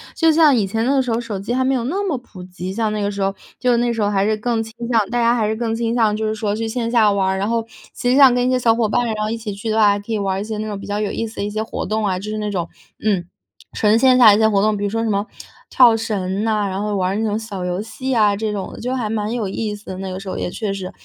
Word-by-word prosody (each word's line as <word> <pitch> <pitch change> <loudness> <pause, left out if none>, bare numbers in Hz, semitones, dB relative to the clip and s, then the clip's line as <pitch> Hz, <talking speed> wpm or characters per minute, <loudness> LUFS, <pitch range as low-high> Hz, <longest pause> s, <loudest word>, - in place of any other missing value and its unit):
就 325 -2 +4
像 310 -4 +5
以 210 -4 +2
前 225 +4 -1
的 270 +1 +3
时 250 -2 -2
候， 225 - +1
手 230 -4 -5
机 205 +5 -4
还 260 0 +1
没 270 - +2
有 240 - -1
那 355 +11 -2
么 300 -8 -1
普 205 -6 -13
及， 185 0 -6
像 215 +1 -1
那 210 - -2
个 200 - 0
时 200 0 -5
候， 195 0 0 0.2
就 250 -1 +2
那 240 +1 +1
个 235 - 0
时 225 - -2
候 205 - +2
还 195 -1 +1
是 215 0 +1
更 225 0 -1
倾 225 - -11 0.2
向 225 -4 +3
大 240 - -1
家 235 0 +3
还 215 -3 0
是 220 - -1
更 225 -1 -1
倾 230 0 -1
向， 220 -3 +2
就 220 - -2
是 215 - 0
说 210 -1 -2
去 225 +1 -3
线 230 0 -2
下 220 -3 +4
玩 195 -1 +1
儿。 190 - -1
然 200 +3 -1
后 230 -1 0
实 220 - -14
际 255 - +3
上 270 -3 +7
跟 245 0 +1
一 - - +2
些 255 - +2
小 235 -2 +3
伙 230 -2 +1
伴 240 +3 +1
然 225 - -1
后 215 - -1
一 225 - -1
起 220 -3 -5
去 200 +3 -5
的 215 - 0
话， 210 -2 +6
还 200 0 +1
可 215 +3 -6
以 215 - +1
玩 195 -1 -1
儿 - - -2
一 - - -3
些 220 -1 -4
那 215 - -3
种 205 -2 -5
比 - - -9
较 205 - -2
有 210 - -1
意 230 - -3
思 220 - -12
的 - - -2
一 205 - -2
些 215 +1 -3
活 220 - -4
动 215 0 -1
啊， 185 -2 0
就 205 +3 -6
是 215 - -3
那 210 -1 -2
种， 175 -4 -3 0.3
嗯， 200 -5 +1 0.5
纯 215 +1 +3
线 255 0 +5
下 240 -3 +8
的 205 - +6
一 - - 0
些 220 - +5
活 200 -2 +2
动， 215 0 +2
比 205 - -4
如 200 - 0
说 225 +2 -1
什 225 - -1
么 200 0 0 0.4
跳 240 -3 +6
绳 200 -2 -2
呐， 215 -2 +1
然 190 +1 -3
后 210 -1 -2
玩 185 -1 0
儿 - - -2
那 220 - -1
种 210 +1 -1
小 200 -4 -6
游 180 +2 -2
戏 260 +4 -4
啊， 210 -4 +3
这 215 +1 -2
种 200 -2 -4
的。 - - -10
就 250 +2 -2
还 225 -4 -2
蛮 215 0 -2
有 225 -4 -2
意 210 +2 -3
思 205 0 -11
的， 185 - -6
那 190 -1 -5
个 185 - -5
时 195 - -10
候 - - -4
也 - - -2
确 210 0 -3
实。 185 -2 -6
215 Hz, 375 characters per minute, -20 LUFS, 205-230 Hz, 0.5 s, 下